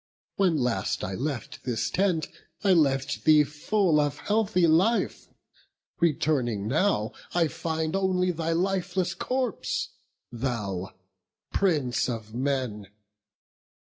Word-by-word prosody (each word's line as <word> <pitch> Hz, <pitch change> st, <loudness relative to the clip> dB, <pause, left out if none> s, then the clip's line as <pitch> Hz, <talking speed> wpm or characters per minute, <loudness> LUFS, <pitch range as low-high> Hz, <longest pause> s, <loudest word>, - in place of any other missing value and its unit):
When 185 Hz, -5 st, +3 dB
last 125 Hz, -8 st, -1 dB
I 95 Hz, -, -3 dB
left 140 Hz, +4 st, -4 dB
this 120 Hz, -1 st, -1 dB
tent, 180 Hz, -5 st, +1 dB, 0.4 s
I 195 Hz, -2 st, +5 dB
left 140 Hz, -4 st, +1 dB
thee 155 Hz, -1 st, +6 dB
full 150 Hz, +4 st, +1 dB
Of 145 Hz, -1 st, 0 dB
healthy 210 Hz, -4 st, +1 dB
life; 180 Hz, +9 st, +2 dB, 0.7 s
returning 135 Hz, -10 st, +1 dB
now, 140 Hz, -, +1 dB, 0.2 s
I 170 Hz, -2 st, +4 dB
find 160 Hz, +1 st, -2 dB
Only 185 Hz, -1 st, +1 dB
thy 165 Hz, -1 st, -2 dB
lifeless 185 Hz, +1 st, 0 dB
corpse, 255 Hz, -4 st, -2 dB, 0.4 s
thou 105 Hz, -7 st, -3 dB, 0.6 s
Prince 150 Hz, -11 st, +1 dB
of 110 Hz, -2 st, -5 dB
men! 125 Hz, -5 st, -2 dB
155 Hz, 110 wpm, -27 LUFS, 125-180 Hz, 0.7 s, thee